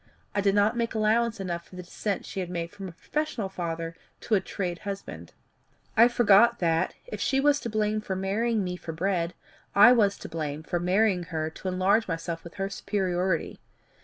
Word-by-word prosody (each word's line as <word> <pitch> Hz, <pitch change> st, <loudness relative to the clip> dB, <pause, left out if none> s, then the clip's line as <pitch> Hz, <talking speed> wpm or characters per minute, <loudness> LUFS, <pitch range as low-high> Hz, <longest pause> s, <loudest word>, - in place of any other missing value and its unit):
I 205 Hz, -, +1 dB
did 200 Hz, 0 st, +2 dB
not 205 Hz, +3 st, +3 dB
make 230 Hz, -1 st, -1 dB
allowance 220 Hz, +1 st, +2 dB
enough 175 Hz, -3 st, -4 dB
for -, -, -14 dB
the 180 Hz, -, -7 dB
descent 195 Hz, +2 st, -3 dB
she -, -, -6 dB
had 180 Hz, -2 st, -3 dB
made 170 Hz, -1 st, -4 dB
from 195 Hz, -2 st, -8 dB
a -, -, -7 dB
professional 235 Hz, -, -3 dB
father 165 Hz, -2 st, -4 dB, 0.3 s
to -, -, -3 dB
a 200 Hz, -, +4 dB
trade 180 Hz, -3 st, -4 dB
husband. 195 Hz, -, -7 dB, 0.6 s
I 230 Hz, +2 st, +8 dB
forgot 235 Hz, -1 st, +5 dB
that, 165 Hz, -4 st, +1 dB
if -, -, -6 dB
she 270 Hz, -, +2 dB
was 285 Hz, +1 st, +3 dB
to 235 Hz, -, -5 dB
blame 215 Hz, 0 st, 0 dB
for 190 Hz, -2 st, -3 dB
marrying 210 Hz, +3 st, 0 dB
me 180 Hz, -1 st, -3 dB
for 165 Hz, -, -7 dB
bread, 175 Hz, 0 st, -1 dB, 0.4 s
I 205 Hz, +5 st, +9 dB
was 205 Hz, -5 st, +3 dB
to -, -, -8 dB
blame 155 Hz, -2 st, -4 dB
for 175 Hz, +2 st, -2 dB
marrying 185 Hz, 0 st, +2 dB
her 160 Hz, -2 st, -3 dB
to 190 Hz, -, -8 dB
enlarge 185 Hz, +4 st, +2 dB
myself 165 Hz, -1 st, -4 dB
with 170 Hz, -, -11 dB
her 195 Hz, -1 st, -2 dB
superiority. 185 Hz, -3 st, -1 dB
195 Hz, 195 wpm, -27 LUFS, 175-215 Hz, 0.6 s, I